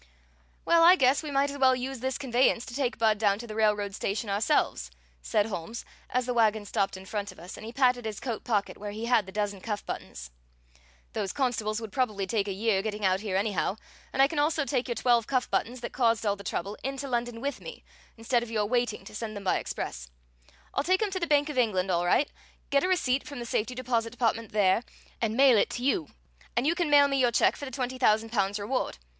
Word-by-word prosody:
"Well, 335 0 +5
I 350 +2 +8
guess 265 -4 +3
we 310 - -6
might 280 0 +1
as 285 - -7
well 260 -1 +5
use 260 +1 -4
this 260 +2 -2
conveyance 250 -3 +2
to - - -9
take 260 -1 -1
Budd 220 -2 +2
down 200 -2 +3
to 235 - -8
the 215 - -7
railroad 210 -2 +1
station 200 +2 -2
ourselves," 200 - +1 0.3
said 205 - +1
Holmes, 220 +2 -6 0.2
as 250 0 0
the 250 - -1
wagon 220 -3 +2
stopped 200 -2 -1
in 190 - -11
front 205 0 -4
of - - -17
us, 175 +3 -9
and - - -11
he - - -6
patted 250 -2 +2
his 215 -2 -4
coat 240 -5 -4
pocket 210 -4 -1
where 205 0 -5
he 215 +3 -5
had 235 -5 +2
the - - -8
dozen 205 -1 -2
cuff 210 -1 -4
buttons. - - -7 0.8
"Those 195 - -2
constables 225 -5 -1
would 220 -3 -7
probably 215 -6 0
take 205 0 -1
a - - -2
year 200 0 +1
getting 210 0 -3
out 185 0 +3
here 200 -3 -2
anyhow, 200 -1 0 0.3
and 270 - +4
I - - +6
can 300 0 -3
also 305 0 +1
take 260 -3 -1
your 240 - -2
twelve 235 -2 +2
cuff 255 -2 0
buttons 245 +1 -1
that - - -6
caused 230 -3 +2
all 200 -1 +2
the 200 - -11
trouble 200 +2 -4
into 275 +1 -3
London 240 -2 -2
with 280 +4 -4
me, - - -9 0.3
instead 235 +2 +1
of 240 - -6
your 215 -2 0
waiting 240 -1 -1
to - - -11
send 215 0 -5
them 200 - -7
by 190 - +2
express. - - -5 0.6
I'll - - 0
take 370 +6 +2
'em 415 - -1
to 375 - -2
the 340 - -1
Bank 290 -1 +3
of 295 -4 -2
England 195 -6 +1
all 175 0 +1
right, 280 +10 +3 0.4
get 280 0 +3
a - - +2
receipt 275 -8 +1
from 285 -1 -7
the 240 - -5
safety 235 +2 -1
deposit 240 -2 -1
department 230 -2 -1
there, 205 0 +3 0.4
and 225 0 0
mail 265 -5 +6
it - - +2
to 245 - -5
you; 255 - +1 0.5
and 240 - +2
you 320 - +3
can 345 -3 -1
mail 285 -1 +7
me 275 -1 0
your 245 -2 +3
check - - +3
for 285 - -7
the - - -6
twenty 255 0 -4
thousand 220 -2 +3
pounds 200 -2 0
reward. 215 +6 -2
230 Hz, 240 wpm, -28 LUFS, 205-260 Hz, 0.8 s, I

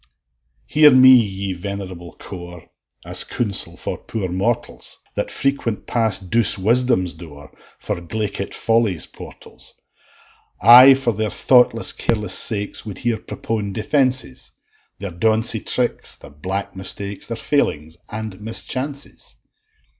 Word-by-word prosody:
Hear 150 0 +6
me, 130 -1 +7
ye 100 -5 +1
venerable 90 -2 -7
core, 90 -2 -10 0.4
As - - +4
counsel 105 -6 -2
for - - -5
poor 100 -5 -5
mortals 100 +7 -2 0.2
That - - -3
frequent 135 -6 -2
pass 110 -5 +2
douce 105 +4 +1
Wisdom's 110 -3 +2
door 75 -4 -13 0.2
For - - -4
glaikit 100 +2 -4
Folly's 115 -7 +1
portals: - - -10 0.8
I, 125 +6 +9
for 135 -3 -1
their 110 +1 -2
thoughtless, 125 -2 +3
careless 105 -2 -1
sakes, 105 -2 +1
Would 105 -3 -8
here 120 -2 -2
propone 105 -3 -5
defences 130 - 0 0.5
Their 100 -1 -6
donsie 110 +5 +2
tricks, 125 -1 -1
their - - -15
black 95 +8 -5
mistakes, 100 +1 -1
Their 115 - -5
failings 80 - -1
and 110 -2 -6
mischances. 130 +6 -4
105 Hz, 120 wpm, -20 LUFS, 95-120 Hz, 0.8 s, I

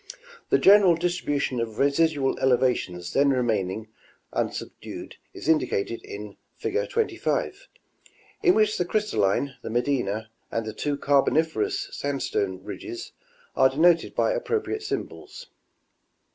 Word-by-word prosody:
The - - +5
general 195 -3 +7
distribution 165 -7 -1
of 115 -2 -3
residual 140 0 +2
elevations 120 -9 +1
then 140 0 +4
remaining 110 -5 0 0.5
unsubdued - - -5
is - - -9
indicated 115 -8 +1
in 105 0 -8 0.2
fig. 455 +5 -2
25, 460 +2 -1 0.7
in 365 -4 +5
which 215 -2 +2
the 180 - +1
Crystalline, 140 - 0
the - - -6
Medina, 110 -3 -1 0.2
and 115 -1 -2
the 110 - -5
two 145 +5 -2
Carboniferous 160 - +1
sandstone 100 - -2
ridges 355 - -7 0.4
are 130 - +5
denoted 165 +4 +3
by - - +2
appropriate 450 -3 -2
symbols. 480 +3 -6
140 Hz, 115 wpm, -25 LUFS, -, 0.7 s, general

